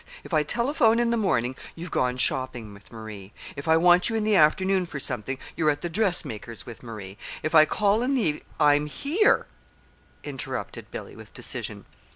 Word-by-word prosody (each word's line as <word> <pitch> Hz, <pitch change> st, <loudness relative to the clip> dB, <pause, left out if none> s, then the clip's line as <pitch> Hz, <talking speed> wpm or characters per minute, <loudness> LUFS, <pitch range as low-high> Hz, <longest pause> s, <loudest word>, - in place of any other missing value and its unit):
If -, -, -10 dB
I 155 Hz, -, +4 dB
telephone 235 Hz, -, +2 dB
in 240 Hz, -1 st, +2 dB
the -, -, +2 dB
morning, 130 Hz, -, 0 dB, 0.2 s
you've 170 Hz, +1 st, -7 dB
gone 125 Hz, 0 st, 0 dB
shopping 125 Hz, -4 st, 0 dB
with 100 Hz, -1 st, -17 dB
Marie. 110 Hz, -4 st, -9 dB, 0.2 s
If 140 Hz, -, -7 dB
I 160 Hz, 0 st, +5 dB
want 175 Hz, +3 st, +5 dB
you 225 Hz, -, -2 dB
in 220 Hz, -, 0 dB
the 215 Hz, -1 st, +2 dB
afternoon 185 Hz, +3 st, +3 dB
for 145 Hz, -, -6 dB
something, 130 Hz, 0 st, -3 dB, 0.2 s
you're 155 Hz, -2 st, +2 dB
at 145 Hz, 0 st, -1 dB
the 175 Hz, -, -3 dB
dressmaker's 160 Hz, -, -2 dB
with 120 Hz, -, -10 dB
Marie. 105 Hz, -5 st, -9 dB, 0.2 s
If 155 Hz, -, -2 dB
I 155 Hz, -1 st, +8 dB
call 205 Hz, +5 st, +1 dB
in 265 Hz, +3 st, +1 dB
the 255 Hz, -, +2 dB
evening 150 Hz, -4 st, -1 dB
" -, -, -25 dB
"I'm 145 Hz, 0 st, +4 dB
here," 290 Hz, -, +2 dB, 0.8 s
interrupted -, -, -6 dB
Billy, -, -, -8 dB
with -, -, -14 dB
decision. -, -, -3 dB
155 Hz, 190 wpm, -25 LUFS, 125-200 Hz, 0.8 s, I